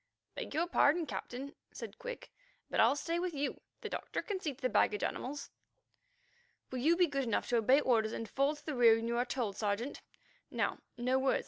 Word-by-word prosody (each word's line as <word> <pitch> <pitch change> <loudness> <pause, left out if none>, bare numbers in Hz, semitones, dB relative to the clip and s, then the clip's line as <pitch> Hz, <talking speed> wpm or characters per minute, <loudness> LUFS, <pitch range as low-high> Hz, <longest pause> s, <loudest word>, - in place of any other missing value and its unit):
"Beg - - -5
your 330 +2 +2
pardon, 335 -1 +3
Captain," 275 0 -5 0.2
said - - -8
Quick, - - -7 0.4
"but - - 0
I'll 235 +5 +6
stay 335 +4 -1
with 355 -2 -2
you. 285 0 -2 0.2
The 440 - -4
doctor - - -3
can 405 -3 -3
see 315 -5 -2
to - - -23
the 255 - +1
baggage 210 -4 +2
animals." 280 +3 -3 1.2
"Will 255 - -2
you 325 +7 +4
be 360 - +6
good 275 -4 -1
enough 225 - 0
to 240 - +3
obey 255 +6 +5
orders 225 -5 +2
and 225 - -4
fall 275 +5 +1
to 295 - -16
the 305 - -2
rear 235 -3 +7
when 225 0 -2
you 235 0 0
are 245 - +2
told, 235 -6 -2
Sergeant? 215 +5 -2 0.5
Now, - - -1 0.2
no 255 +2 +2
words. 265 0 +2
270 Hz, 210 wpm, -34 LUFS, 235-305 Hz, 1.2 s, rear